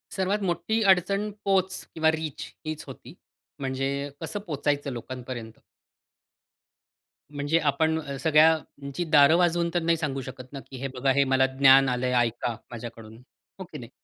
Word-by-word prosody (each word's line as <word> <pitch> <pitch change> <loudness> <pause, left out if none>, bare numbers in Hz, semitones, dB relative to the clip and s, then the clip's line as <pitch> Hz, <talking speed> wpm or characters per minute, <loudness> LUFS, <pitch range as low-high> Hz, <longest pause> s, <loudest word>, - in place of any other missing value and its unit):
सर्वात 195 +2 0
मोठी 205 +5 0
अडचण 195 +3 +1 0.2
पोच 190 -1 +1
किंवा 160 -1 +3
रीच 160 -2 -4 0.2
हीच 155 0 -4
होती. 130 0 -11 0.5
म्हणजे 135 +1 -2
कसं 205 - -4
पोहचायचं 145 -2 -1
लोकांपर्यंत? 120 -2 -7 1.7
म्हणजे 145 +3 0
आपण 160 +2 +1
अ, 140 -2 -6
सगळ्यांची 155 -1 +2
दार 145 0 +6
वाजवून 175 -1 +2
तर 175 - +1
नाही 165 0 +2
सांगू 140 -4 -3
शकत 130 0 -10
ना, 140 - -5
की 130 +1 -11
"हे 135 - -2
बघा, 135 +1 +1
हे 140 +1 +3
मला 130 -1 +3
ज्ञान 135 0 +7
आलं 125 0 -1
आहे, 125 - 0
ऐका 120 +1 -4 0.2
माझ्याकडून." 115 -2 -9 0.4
हो - - -5
की - - -7
नाही? 120 -1 -10
145 Hz, 155 wpm, -26 LUFS, 130-165 Hz, 1.7 s, ज्ञान